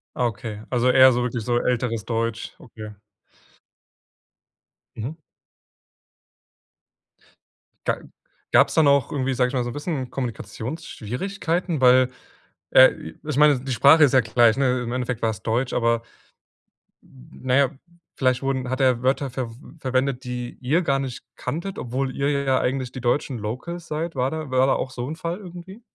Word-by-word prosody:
Ah 125 - +1
okay, 110 -2 -6
also, 125 0 +3
eher 130 0 +7
so 120 0 0
wirklich 120 -2 -3
so 120 +1 +1
älteres 120 -3 -1
Deutsch, 115 -1 -2
okay. 110 -3 -10 2.0
Mhm. 125 +8 -5 2.7
Ga - - +1 0.5
gab's - - +5
da 160 - +5
noch 140 -3 +3
irgendwie, 135 -2 -1
sage 125 0 +2
ich - - -9
mal, 125 -2 0
so 120 - -4
'n - - -9
bisschen 145 -4 -3
Kommunikationsschwierigkeiten? 140 - -4
Weil, 125 0 +6 0.6
äh, - - +8
i 80 - -11
ich 150 -3 -2
meine, 150 -3 +5
die 130 +1 -6
Sprache 140 +7 +6
ist 140 - +4
ja 130 - +6
gleich, 115 +1 +3
'ne? 130 -2 +1
Im 120 - -4
Endeffekt 125 -2 -3
war's 110 -4 -2
Deutsch, 120 +3 -1
aber, 115 -1 +1 1.0
na 65 - -5
ja, 140 -2 +4 0.5
vielleicht 130 -2 +1
wurden 130 -2 -1
hat 130 +2 -2
er 125 -2 +2
Wörter 135 +1 +1
verw 125 -2 -4 0.3
verwendet, 130 0 -1
die 125 -1 -5
ihr 150 +8 +2
gar 140 -3 +1
nicht 125 -2 -5
kanntet, 170 +9 -5
obwohl 130 +2 -3
ihr 140 +1 0
ja 130 -1 +2
eigentlich 130 -1 -1
die 130 - -7
deutschen 125 +1 0
locals 155 +11 -5
seid. 160 +2 -3
War 130 +1 0
da 155 -3 -5
war 130 +1 +3
da - - +3
auch 130 - -3
so 125 -1 -5
'n 155 - -4
Fall 170 +1 -4
irgendwie? 185 +2 -11
130 Hz, 160 wpm, -23 LUFS, 120-140 Hz, 2.7 s, äh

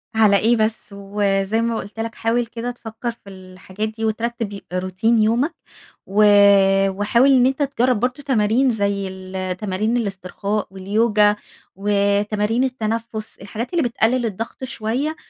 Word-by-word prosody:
على 210 -2 +5
إيه 230 +3 +3
بس؟ 220 0 +1
وزي 200 +1 -1
ما 230 0 0
قُلت 205 +3 -8
لك 225 0 -4
حاول 235 +1 0
كده 235 +1 -5
تفكَر 235 0 -6
في 225 -3 -16
الحاجات 185 +2 -7
دي 220 +1 -5
وترتب 225 0 -2
ي 200 - -8
روتين 185 +5 +1
يومك 245 +9 +1 0.5
و 205 +2 +3 0.7
وحاول 210 +7 +3
إن 255 -2 +5
أنت 265 +3 +1
تجرب 255 -4 +1
برضه 255 +4 -2
تمارين 245 0 +2
زي 200 -3 -1
التمارين 190 +4 -3
الاسترخاء 200 0 -3
واليوجا 210 +2 +2 0.4
وتمارين 205 +3 +1
التنفس، 225 -3 -3
الحاجات 225 - -6
اللي 340 - +2
بتقلل 240 +1 +1
الضغط 225 +4 -5
شوية 255 +6 -2
220 Hz, 135 wpm, -21 LUFS, 200-235 Hz, 0.7 s, على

